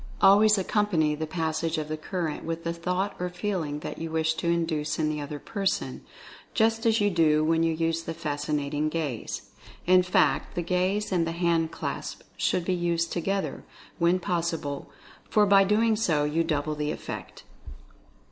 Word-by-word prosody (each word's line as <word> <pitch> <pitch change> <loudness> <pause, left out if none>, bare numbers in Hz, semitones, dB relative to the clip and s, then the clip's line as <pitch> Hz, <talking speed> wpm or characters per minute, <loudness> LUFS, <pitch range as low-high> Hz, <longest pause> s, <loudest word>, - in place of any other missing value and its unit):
Always 205 +2 +6
accompany 185 -6 +1
the 155 +1 -3
passage 160 0 -1
of 155 -1 -2
the 155 - -2
current 160 0 -3
with 165 0 -4
the 170 - -1
thought 180 +4 -2
or 180 0 -2
feeling 175 -6 -3
that - - -6
you 165 - -4
wish 160 0 +1
to - - -2
induce 165 -3 0
in 155 -1 +1
the 150 -1 -2
other 145 +1 -5
person, 195 +5 -2 0.5
just 225 0 +2
as 225 0 +3
you 205 0 +2
do 155 -3 +3
when 165 +1 +2
you 165 0 +2
use 165 0 0
the 165 0 -5
Fascinating 150 -1 -1
Gaze. 150 -8 -3 0.4
In 185 +1 +6
fact, 155 -6 +1
the 175 - -1
Gaze 185 +4 0
and 170 -3 +1
the 165 - -2
hand 170 -1 +1
clasp 165 - -5
should 175 - 0
be 185 - +1
used 170 -1 0
together, 195 +3 -2 0.4
when 170 +2 +4
pos 175 -2 0
sible, 145 -4 -5 0.4
for 210 -1 +4
by 200 -1 +6
so 195 - +2 0.6
doing 150 - -2
you 165 +1 +2
double 155 -2 -1
the 150 0 -2
effect. - - -6
165 Hz, 175 wpm, -27 LUFS, 155-180 Hz, 0.6 s, Always